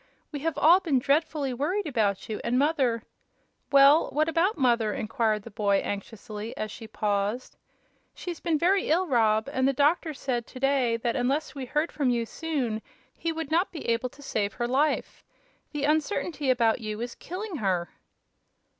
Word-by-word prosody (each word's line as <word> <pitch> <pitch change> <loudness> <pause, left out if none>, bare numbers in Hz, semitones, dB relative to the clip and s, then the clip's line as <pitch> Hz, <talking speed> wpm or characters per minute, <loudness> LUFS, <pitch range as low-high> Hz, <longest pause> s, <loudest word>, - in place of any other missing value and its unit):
We 290 - -4
have 310 0 -2
all 330 +5 +6
been 320 -8 +1
dreadfully 285 0 +1
worried 360 +11 -1
about 210 -9 0
you, 215 - -4
and 240 +1 +1
mother 265 -6 +1 0.3
" - - -44
"Well, 280 +3 +6
what 310 +2 +1
about 340 +5 +1
mother?" 235 -6 +2
inquired 220 -2 0
the 230 - -10
boy, 200 -1 +2
anxiously, 210 +1 -6
as 215 -1 -3
she 225 - -9
paused. 210 +2 -2 0.6
"She's 350 -2 -6
been 325 -2 0
very 375 +5 +2
ill, 345 +4 +3
Rob; 220 -6 +2
and 260 -1 +2
the 275 - +2
doctor 300 +3 +2
said 245 -3 -2
to 255 - -10
day 265 -4 +2
that 235 0 -1
unless 270 +4 0
we 270 -2 -5
heard 300 +5 0
from 280 -4 0
you 235 -1 +1
soon 255 -7 -3 0.3
he 335 - -2
would 320 -2 -5
not 345 +4 +2
be 325 - -7
able 235 +2 0
to 285 - -16
save 205 -6 -1
her 240 - -2
life. 280 +5 0 0.5
The 295 -1 -3
uncertainty 305 -1 0
about 235 -2 +3
you 215 -1 -4
is 240 +1 -4
killing 370 0 -6
her." 185 - 0
265 Hz, 180 wpm, -27 LUFS, 225-310 Hz, 0.6 s, all